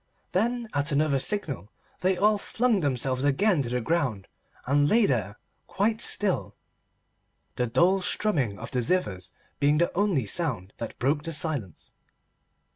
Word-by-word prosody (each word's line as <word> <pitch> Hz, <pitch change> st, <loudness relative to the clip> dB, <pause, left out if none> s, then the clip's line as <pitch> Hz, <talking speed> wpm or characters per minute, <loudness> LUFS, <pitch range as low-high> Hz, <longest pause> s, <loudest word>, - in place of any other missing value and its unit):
Then 235 Hz, +5 st, 0 dB
at 145 Hz, +3 st, 0 dB
another 140 Hz, -1 st, +2 dB
signal 135 Hz, -, -2 dB, 0.3 s
they 185 Hz, +2 st, +1 dB
all 210 Hz, +2 st, +3 dB
flung 230 Hz, 0 st, +1 dB
themselves 130 Hz, -3 st, 0 dB
again 165 Hz, +4 st, +2 dB
to 120 Hz, -, -4 dB
the 125 Hz, 0 st, -1 dB
ground 125 Hz, -, -1 dB, 0.4 s
and 145 Hz, +2 st, +2 dB
lay 230 Hz, -1 st, +4 dB
there 105 Hz, -, -1 dB, 0.3 s
quite 215 Hz, +3 st, 0 dB
still, 105 Hz, -, +1 dB, 1.0 s
the 125 Hz, -, 0 dB
dull 180 Hz, +11 st, +3 dB
strumming 145 Hz, -, 0 dB
of -, -, -8 dB
the 125 Hz, -, 0 dB
zithers 105 Hz, -, -1 dB, 0.3 s
being 145 Hz, +1 st, +3 dB
the 170 Hz, +2 st, +1 dB
only 185 Hz, -, +1 dB
sound 105 Hz, -, -1 dB
that 115 Hz, -, -6 dB
broke 145 Hz, +4 st, +1 dB
the 165 Hz, +2 st, -5 dB
silence. 145 Hz, -, -4 dB
145 Hz, 145 wpm, -26 LUFS, 125-190 Hz, 1.0 s, lay